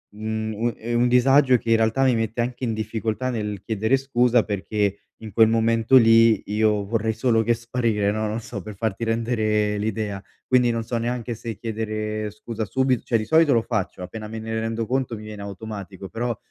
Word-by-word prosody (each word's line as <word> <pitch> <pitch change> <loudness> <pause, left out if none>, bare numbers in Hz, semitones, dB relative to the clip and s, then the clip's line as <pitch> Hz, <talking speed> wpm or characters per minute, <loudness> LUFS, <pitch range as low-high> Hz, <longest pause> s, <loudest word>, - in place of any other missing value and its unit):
mhmm, 110 +1 -2
è 120 +2 -5
un 120 - +3
un - - +3
disagio 130 +2 +5
che - - -6
in 115 - +6
realtà 115 +4 +2
mi 130 -3 +4
mette 115 +1 -1
anche 125 +2 -4
in 115 -3 0
difficoltà 110 +3 -2
nel 105 -4 -3
chiedere 110 +4 +1
scusa 125 -3 +2
perché 100 0 -1 0.3
in 110 - -7
quel 110 +2 +5
momento 115 +2 +2
lì 115 -2 +6
io 105 -1 +1
vorrei 110 +1 -1
solo 115 0 +2
che 120 +2 +2
sparire 115 -3 0
no, 110 0 -1
non 110 +2 -3
so 110 -3 -7
per 105 +2 -9
farti 110 +2 -2
rendere 110 -2 0
l'idea. 105 -2 -3 0.2
Quindi 125 -1 +3
non 115 -1 -1
so 115 +1 -3
neanche 120 0 -2
se 115 -1 -6
chiedere 110 -1 -3
scusa 110 +1 -5
subito. 130 +1 0
Cioè 115 - +1
di 110 - -2
solito 160 +4 +4
lo 115 - +3
faccio 105 -6 -3
appena 105 +4 -7
me 110 +1 -6
ne 110 0 -3
rendo 115 0 -2
conto 125 0 -1
mi 105 - -9
viene 105 -1 -8
automatico 100 -2 -7
però 120 -1 -3
110 Hz, 200 wpm, -23 LUFS, 105-120 Hz, 0.3 s, in